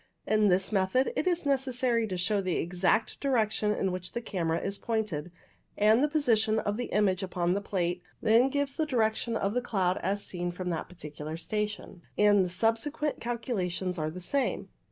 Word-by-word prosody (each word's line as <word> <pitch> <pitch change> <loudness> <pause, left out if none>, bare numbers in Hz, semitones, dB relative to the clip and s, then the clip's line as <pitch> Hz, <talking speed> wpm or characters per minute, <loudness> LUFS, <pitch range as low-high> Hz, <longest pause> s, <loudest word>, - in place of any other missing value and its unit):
In 215 -1 +3
this 190 +1 +2
method 215 - +2
it - - 0
is 350 -3 +1
necessary 255 -4 +1
to 185 -3 -3 0.2
know 200 - +2
the 185 -3 -1
exact 180 +6 0
direction 220 -6 +1
in 195 -2 0
which 180 0 -5
the 235 - -2
camera 170 -6 -1
is 195 +1 -4
pointed, 210 -8 -2 0.5
and 215 +5 +5
the - - +4
position 225 -8 +2
of 205 -1 -1
the 245 - -2
image 195 -4 +1
upon 180 -2 0
the 200 - -1
plate 180 -3 -1 0.2
then 230 +4 +4
gives 285 0 -1
the 315 -2 0
direction 230 -3 0
of 200 +1 -1
the 250 - +1
cloud 190 -6 0
as 200 +1 -2
seen 175 -1 -3
from 180 0 -4
that 165 - -3
particular 155 -2 -7
station, 210 -1 -4 0.2
and 205 -2 +5
the 180 - -2
subsequent 230 +10 0
calculations 190 -7 -2
are 155 0 -1
the 175 +4 -7
same. 275 +9 -1
210 Hz, 185 wpm, -29 LUFS, 180-235 Hz, 0.5 s, and